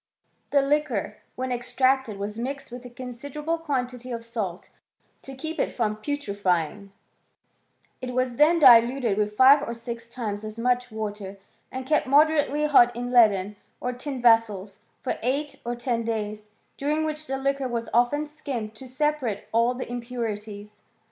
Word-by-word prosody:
The 280 Hz, -1 st, +3 dB
liquor, 275 Hz, -8 st, 0 dB, 0.2 s
when 255 Hz, 0 st, -3 dB
extracted, 255 Hz, -1 st, +1 dB
was 210 Hz, +2 st, -5 dB
mixed 275 Hz, +2 st, -5 dB
with 245 Hz, 0 st, -8 dB
a -, -, -11 dB
considerable 285 Hz, +6 st, -5 dB
quantity 255 Hz, -5 st, -3 dB
of 230 Hz, -1 st, -5 dB
salt 210 Hz, -6 st, -4 dB, 0.5 s
to 270 Hz, -, -9 dB
keep 320 Hz, +4 st, -5 dB
it -, -, +1 dB
from 215 Hz, -3 st, -1 dB
putrifying; 200 Hz, -, -2 dB, 1.1 s
it 250 Hz, -1 st, -5 dB
was 255 Hz, -2 st, 0 dB
then 320 Hz, +3 st, +5 dB
diluted 245 Hz, -4 st, +6 dB
with 210 Hz, 0 st, -1 dB
five 275 Hz, +2 st, +8 dB
or 235 Hz, -5 st, -4 dB
six 235 Hz, 0 st, -7 dB
times 215 Hz, -4 st, -4 dB
as 215 Hz, 0 st, -7 dB
much 250 Hz, +1 st, +1 dB
water, 205 Hz, -2 st, -5 dB, 0.3 s
and 260 Hz, 0 st, -5 dB
kept 300 Hz, 0 st, +1 dB
moderately 295 Hz, +1 st, +3 dB
hot 245 Hz, -5 st, +5 dB
in 245 Hz, +1 st, -4 dB
leaden 210 Hz, -4 st, +4 dB, 0.2 s
or 250 Hz, 0 st, -2 dB
tin 255 Hz, 0 st, -5 dB
vessels, 215 Hz, -4 st, +3 dB, 0.2 s
for 260 Hz, -, -2 dB
eight 280 Hz, +5 st, -2 dB
or 240 Hz, +1 st, -3 dB
ten 240 Hz, -1 st, -1 dB
days, 215 Hz, -2 st, -4 dB, 0.3 s
during 300 Hz, +3 st, 0 dB
which 310 Hz, 0 st, -4 dB
the 270 Hz, -, -2 dB
liquor 275 Hz, 0 st, -1 dB
was 235 Hz, -2 st, -3 dB
often 245 Hz, +6 st, +2 dB
skimmed 275 Hz, -8 st, -5 dB
to 255 Hz, +4 st, -11 dB
separate 260 Hz, -5 st, -1 dB
all 235 Hz, +2 st, +2 dB
the 255 Hz, -, -5 dB
impurities. 215 Hz, -4 st, -5 dB
245 Hz, 155 wpm, -25 LUFS, 220-275 Hz, 1.1 s, five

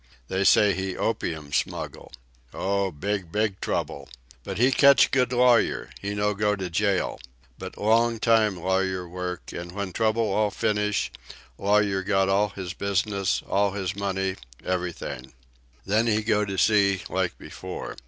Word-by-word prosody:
They 95 Hz, +1 st, 0 dB
say 105 Hz, 0 st, +5 dB
he 95 Hz, -1 st, -3 dB
opium 80 Hz, -9 st, -3 dB
smuggle. -, -, -3 dB, 0.4 s
Oh, 100 Hz, 0 st, 0 dB
big, 95 Hz, +2 st, -3 dB
big 105 Hz, -1 st, 0 dB
trouble. -, -, -3 dB, 0.3 s
But -, -, -5 dB
he 125 Hz, +4 st, +4 dB
catch 140 Hz, +1 st, +6 dB
good 125 Hz, -2 st, +2 dB
lawyer. 125 Hz, -2 st, +3 dB
He 100 Hz, +1 st, -3 dB
no 105 Hz, 0 st, +1 dB
go 105 Hz, 0 st, +1 dB
to 95 Hz, -3 st, -5 dB
jail. 100 Hz, +2 st, 0 dB, 0.4 s
But 95 Hz, 0 st, -8 dB
long 115 Hz, +2 st, +2 dB
time 110 Hz, -3 st, +3 dB
lawyer 95 Hz, 0 st, -1 dB
work, 90 Hz, 0 st, -6 dB
and 85 Hz, 0 st, -6 dB
when 100 Hz, -1 st, -5 dB
trouble 110 Hz, -2 st, +1 dB
all 105 Hz, 0 st, +2 dB
finish 105 Hz, 0 st, 0 dB, 0.5 s
lawyer 100 Hz, -1 st, +2 dB
got 95 Hz, 0 st, +1 dB
all 100 Hz, +2 st, +2 dB
his 95 Hz, -2 st, -6 dB
business, 100 Hz, 0 st, -1 dB
all 100 Hz, 0 st, +1 dB
his 95 Hz, -1 st, -3 dB
money, 95 Hz, -1 st, -2 dB, 0.3 s
everything. 90 Hz, -8 st, -4 dB, 0.5 s
Then 110 Hz, +3 st, +2 dB
he 110 Hz, -1 st, +1 dB
go 105 Hz, -1 st, +2 dB
to 95 Hz, -1 st, -4 dB
sea, 100 Hz, -2 st, +3 dB
like 95 Hz, -2 st, -2 dB
before. -, -, -7 dB
100 Hz, 150 wpm, -25 LUFS, 95-105 Hz, 0.5 s, catch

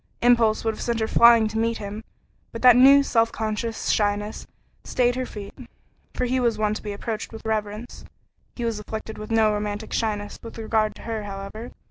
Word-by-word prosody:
Impulse 230 Hz, -3 st, +3 dB
would 225 Hz, -, +1 dB
have -, -, -9 dB
sent 235 Hz, -1 st, -1 dB
her 220 Hz, -, 0 dB
flying 235 Hz, -1 st, +6 dB
to 220 Hz, +1 st, -3 dB
meet 230 Hz, 0 st, 0 dB
him, 210 Hz, +2 st, -7 dB, 0.5 s
but 230 Hz, -, -8 dB
that 250 Hz, -2 st, +8 dB
new, 275 Hz, +3 st, +7 dB
self 230 Hz, -4 st, +2 dB
conscious 220 Hz, +1 st, -3 dB
shyness 205 Hz, 0 st, -1 dB, 0.4 s
stayed 245 Hz, -1 st, +1 dB
her 255 Hz, 0 st, -3 dB
feet, 200 Hz, -2 st, -9 dB, 0.6 s
for 250 Hz, -, 0 dB
he 255 Hz, +1 st, 0 dB
was 235 Hz, -3 st, +1 dB
one 215 Hz, -1 st, +1 dB
to 215 Hz, -, -5 dB
be 210 Hz, -, -5 dB
approached 215 Hz, +2 st, -5 dB
with 225 Hz, 0 st, -11 dB
reverence. 215 Hz, +1 st, -4 dB, 0.5 s
He 240 Hz, -, -4 dB
was 225 Hz, -2 st, -2 dB
afflicted 220 Hz, +1 st, -7 dB
with 215 Hz, -, -7 dB
no 220 Hz, -2 st, +3 dB
romantic 210 Hz, +1 st, -4 dB
shyness 205 Hz, -2 st, -2 dB
with 230 Hz, -, -10 dB
regard 220 Hz, -1 st, 0 dB
to -, -, -13 dB
her, 220 Hz, -2 st, -4 dB
however. 200 Hz, +4 st, -7 dB
220 Hz, 195 wpm, -24 LUFS, 210-230 Hz, 0.6 s, that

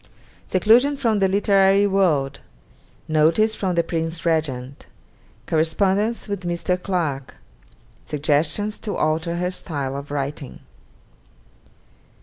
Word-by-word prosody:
_Seclusion 240 Hz, +9 st, +4 dB
from 230 Hz, -6 st, +1 dB
the 195 Hz, -, +3 dB
literary 195 Hz, 0 st, +3 dB
world 170 Hz, -9 st, +1 dB, 0.7 s
Notice 160 Hz, +8 st, +3 dB
from 190 Hz, -4 st, -2 dB
the 170 Hz, -, +2 dB
Prince 165 Hz, 0 st, -3 dB
Regent 140 Hz, -5 st, -2 dB, 0.6 s
Correspondence 195 Hz, +8 st, +1 dB
with 200 Hz, -2 st, -4 dB
Mr. 175 Hz, +1 st, -1 dB
Clarke 160 Hz, -9 st, -2 dB, 0.7 s
Suggestions 155 Hz, +8 st, -1 dB
to 210 Hz, -, -4 dB
alter 160 Hz, +2 st, 0 dB
her 180 Hz, +1 st, -1 dB
style 140 Hz, -7 st, -4 dB
of 140 Hz, +1 st, -7 dB
writing_. 140 Hz, -1 st, -5 dB
170 Hz, 105 wpm, -22 LUFS, 150-200 Hz, 0.7 s, Seclusion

